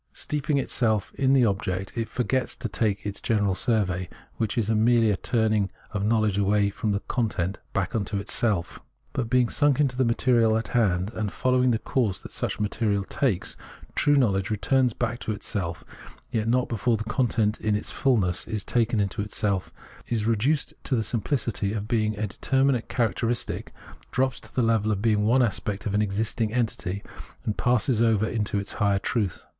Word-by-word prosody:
Steeping 150 0 -1
itself 110 -6 0
in 135 0 +3
its 130 -3 +5
object, 95 -2 -2
it 115 -2 -2
forgets 130 +1 -1
to - - -4
take 105 -1 -1
that 100 -1 -4
general 105 -4 +1
survey, 95 -5 0 0.3
which 110 +2 -1
is 110 -3 +1
merely 115 0 +4
a - - +2
turning 110 -1 +1 0.2
of 105 -1 -2
knowledge 110 -2 +2
away 100 0 +2
from 105 +2 -2
the 100 0 -1
content 100 -6 -2
back 95 -3 -1
into 105 -2 -1
itself. 100 -5 -1 0.3
But 115 -3 -2
being 125 -1 +3
sunk 145 +2 +2
into 135 -4 +2
the 130 - +2
material 115 -2 +3
in 115 - -1
hand, 100 -4 +1
and 105 -2 -2
following 125 0 +2
the 115 - +3
course 110 -5 -1
that - - -10
such - - -3
material 105 -1 0
takes, 105 -2 -1 0.4
true 145 - +3
knowledge 100 -8 +2
retm 130 +5 +2
ns 120 - 0
back 120 0 -2
into 110 - -2
itself, 95 -5 -3 0.5
yet 110 -1 -1
not 125 +2 +2
be 115 - -3
fore 110 +3 +2
the 110 - -4
content 110 -2 0
in 105 -1 +1
its 105 - -3
fullness 100 -10 +1
is 105 -2 -3
taken 115 -2 +1
into 100 +2 -1
itself, 100 -2 -1 0.4
is 110 -3 -1
reduced 120 +7 +1
to 135 - +1
the 115 - +1
simplicity 110 -3 -1
of 105 -1 -3
being 110 -3 0
a 105 - -1
determinate 130 +4 +1
char 120 -3 +2
acteristic, 115 +6 -2 0.4
drops 130 0 0
to - - -13
the 125 - +2
level 110 -2 +2
of 100 - 0
being 105 -1 +2
one 125 +3 +4
aspect 105 -2 -2
of 105 - -1
an 105 - +2
existing 105 +2 -1
entity, 110 -5 -2 0.4
and 105 - -1
passes 125 -1 +2
over 110 -2 +3
into 105 -3 -1
its 100 0 -3
higher 100 -1 +3
truth. 100 -1 -2
110 Hz, 185 wpm, -26 LUFS, 100-120 Hz, 0.5 s, its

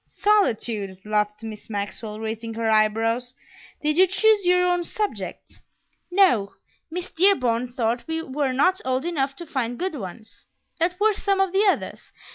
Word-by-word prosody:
"Solitude!" 225 - +1
laughed 210 0 -1
Miss 220 -1 -8
Maxwell, 210 +1 -4
raising 225 +1 -5
her 225 0 -1
eyebrows. 225 +3 +1 0.5
"Did 305 +1 +1
you 375 +1 +6
choose 410 0 +3
your 360 0 +4
own 355 -1 +1
subject?" 420 +4 -5 0.5
"No; 355 - +3 0.4
Miss 360 +3 -5
Dearborn 250 -10 +2
thought 235 0 -1
we 325 0 -2
were 275 -2 -1
not 365 +9 +2
old 260 +3 -1
enough 275 -5 -1
to 345 - -8
find 245 -6 -3
good 375 0 -2
ones." 220 -3 -9 0.3
"What 345 +2 +1
were 430 +1 +4
some 395 -1 0
of 385 -1 +2
the 400 +2 +3
others?" 390 - -1
265 Hz, 155 wpm, -24 LUFS, 225-360 Hz, 0.5 s, you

